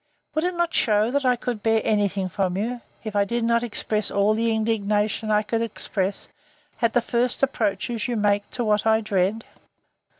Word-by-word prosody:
Would 310 +2 0
it 360 0 -1
not 345 0 0
shew, 215 +1 +2
that 285 0 0
I 250 -1 +4
could 240 -2 -4
bear 225 0 +3
any 205 -2 +2
thing 195 -1 -3
from 185 -1 -1
you, 235 +4 -2 0.2
if 215 -2 -6
I 200 - +4
did 235 +3 -2
not 235 0 +2
express 215 -2 -1
all 200 +1 +2
the 230 +1 +1
indignation 215 -1 0
I 210 0 +3
could 225 +2 -1
express, 200 -3 -2 0.5
at 230 -2 +2
the 245 - +2
first 245 +2 0
approaches 225 -3 0
you 245 - -1
make 205 -1 +1
to 245 - -2
what 215 -1 +1
I 220 0 +4
dread? 205 +1 0
220 Hz, 195 wpm, -24 LUFS, 205-235 Hz, 0.5 s, I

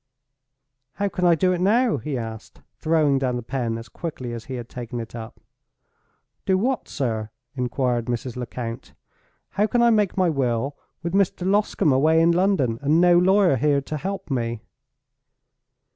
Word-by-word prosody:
"How 200 0 -1
can 180 -1 -2
I 170 -1 +6
do 185 +3 +2
it 180 - -2
now?" 225 +5 +3
he 150 -3 -4
asked, 110 -2 -8 0.2
throwing 155 -4 +2
down 130 -2 -1
the 120 - -4
pen 120 -2 -2
as 115 0 -9
quickly 130 -2 -6
as 115 -1 -7
he 130 - -6
had 120 -2 -6
taken 120 -1 -6
it 115 - -7
up. 115 -1 -8 1.0
"Do 190 - +2
what, 250 +6 -1
sir?" 110 -6 -2 0.2
inquired 125 -2 -1
Mrs. 120 0 -3
Lecount. 120 -1 -6 0.5
"How 205 +3 +1
can 240 +1 +2
I 235 - +5
make 210 -4 +1
my 185 -1 +3
will, 135 -2 -1 0.3
with 170 +1 -3
Mr. 190 -2 +1
Loscombe 200 -6 +2
away 155 +5 +4
in 165 +1 +5
London, 170 - +1
and 150 +3 +3
no 175 0 +5
lawyer 185 -4 +4
here 145 0 +2
to 155 +3 -5
help 190 +1 -5
me?" 115 -3 -2
145 Hz, 170 wpm, -23 LUFS, 120-185 Hz, 1.0 s, I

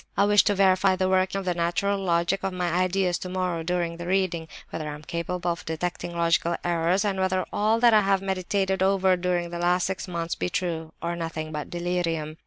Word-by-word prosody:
I 200 - +5
wish 205 0 +5
to 205 - +2
verify 190 0 +4
the 185 0 0
working 190 +1 +1
of 195 - -4
the 180 - +1
natural 185 +4 0
logic 175 +1 0
of 190 -1 -1
my 180 -1 -1
ideas 185 0 +1
tomorrow 180 -2 -2
during 170 0 -2
the 175 0 -6
reading—whether 170 -4 -2
I 150 - -5
am 150 - -12
capable 175 +2 -2
of 170 - -5
detecting 170 +1 -4
logical 170 0 +2
errors, 175 +3 +1
and 195 -2 -1
whether 185 -1 +1
all 215 +2 +2
that 240 -2 +6
I 215 - +6
have 195 -1 +2
meditated 190 0 -1
over 190 -1 +3
during 175 -1 -1
the 170 - -4
last 175 +1 +2
six 190 0 -3
months 170 -2 -3
be - - -2
true, 165 -3 -3
or 170 0 -1
nothing 165 -2 -4
but 150 -1 -5
delirium. 170 -3 -2
180 Hz, 205 wpm, -26 LUFS, 170-190 Hz, -, that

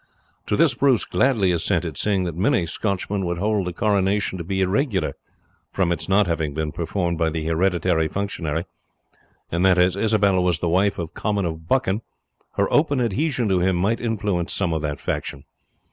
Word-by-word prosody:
To - - +1
this - - +4
Bruce 135 -5 +2
gladly 110 -9 +2
assented, 85 -2 -1
seeing 100 +4 +1
that 85 -2 -3
many 100 - +2
Scotchmen 100 +2 -2
would 85 -1 -2
hold 100 0 0
the - - -2
coronation 100 0 0
to - - -4
be 95 +3 -2
irregular 95 - 0 0.6
from 90 -3 0
its 85 - -2
not 100 +2 +4
having 80 -4 -2
been 80 -1 -2
performed 85 0 -2
by 80 -1 +2
the 80 0 -4
hereditary 85 -1 +1
functionary, 85 -3 -3 0.9
and 85 +2 0
that 95 -1 +5
as 90 +1 +3
Isabel 100 -3 +2
was 90 -3 +2
the 85 - -1
wife 95 +3 +2
of 85 -2 -5
Comyn 105 -3 -1
of 80 -1 -5
Buchan, 115 -4 +1 0.5
her - - +1
open 145 -3 +3
adhesion 125 +2 0
to 95 -1 +2
him 90 +1 +2
might 100 +6 0
influence 105 -7 -1
some 90 -4 0
of 80 - -1
that 75 -1 -3
faction. 70 -2 -4
95 Hz, 180 wpm, -22 LUFS, 85-105 Hz, 0.9 s, that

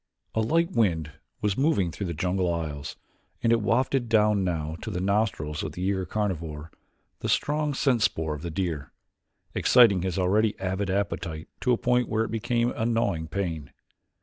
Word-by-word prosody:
A 110 - +1
light 165 - +2
wind 85 - +1 0.3
was 105 -2 +1
moving 130 - +2
through 100 +3 -4
the 85 - -4
jungle 90 +2 0
aisles, 75 -4 -4 0.5
and 115 - +4
it 115 - +2
wafted 120 +3 +1
down 105 -3 +3
now 80 -3 -2
to - - -5
the 90 - -3
nostrils 95 -6 0
of - - -4
the 90 - -5
eager 95 -1 0
carnivore 85 -7 -3 0.5
the - - -3
strong 150 -1 +1
scent 130 -4 +2
spoor 80 -7 +1
of 75 - -6
the 85 - -4
deer, 80 -5 -3 0.6
exciting 115 -7 +5
his 95 -1 -2
already 105 +4 +2
avid 95 +1 -2
appetite 85 -5 -2
to 125 - +1
a 120 - +4
point 125 0 +1
where 110 0 +1
it 115 - -4
became 120 +2 0
a 110 - -3
gnawing 105 -8 0
pain. 80 -5 -3
100 Hz, 175 wpm, -27 LUFS, 85-115 Hz, 0.6 s, exciting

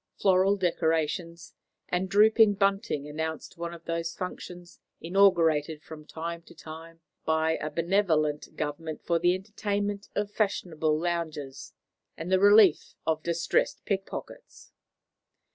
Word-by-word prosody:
Floral 190 +1 +4
decorations 165 -2 -1 0.3
and 185 +1 -1
drooping 215 +1 +5
bunting 195 - 0
announced 160 +3 -5
one 170 0 -4
of 170 -1 -11
those 165 0 -3
functions 180 -1 -8 0.2
inaugurated 165 -4 +3
from 155 -1 -11
time 170 +1 -5
to 170 - -17
time 165 +1 -11 0.2
by 160 0 +1
a 155 - -4
benevolent 165 -4 0
Government 155 +1 -4
for 170 -1 +2
the 175 +1 +3
entertainment 205 0 -3
of 205 0 -1
fashionable 160 -7 0
loungers 155 -5 -4 0.4
and 165 +3 -5
the 190 - +4
relief 205 -3 +5
of 160 -1 0
distressed 170 0 0
pickpockets. 195 -1 -6
170 Hz, 120 wpm, -28 LUFS, 160-195 Hz, 0.4 s, drooping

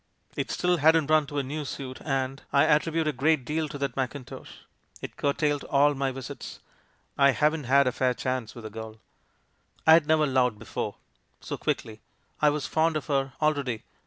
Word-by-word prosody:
It - - -3
still 180 0 +1
hadn't 160 0 +4
run 155 -2 +4
to 145 - -6
a 140 - +1
new 150 +3 -4
suit, 130 -2 -7
and 135 -2 -2
— - - -39
I 140 - +4
attribute 160 +1 +2
a - - +2
great 140 0 +1
deal 155 +1 -2
to 145 - -6
that 140 -3 -3
mackintosh! 130 0 -5 0.5
it - - -8
cur 140 - +1
tailed 145 -2 0
all 145 +1 +3
my 135 -1 -1
visits, 130 -1 -8 0.6
I 140 -1 +6
haven't 150 +4 +1
had 140 +3 +4
a 125 - +2
fair 125 0 0
chance 130 -1 -3
with 120 - -9
the 110 - -7
girl. 110 0 -8 0.9
"I 160 - +8
had 160 -2 +5
never 155 -1 +4
loved 130 -5 +1
before - - -5 0.3
— - - -44
so - - -5
quickly; 110 -1 -3 0.4
I 150 - +6
was 145 -1 -2
fond 160 0 +1
of 150 - -6
her 135 -3 -1
already. 140 -7 0
140 Hz, 200 wpm, -27 LUFS, 130-155 Hz, 0.9 s, I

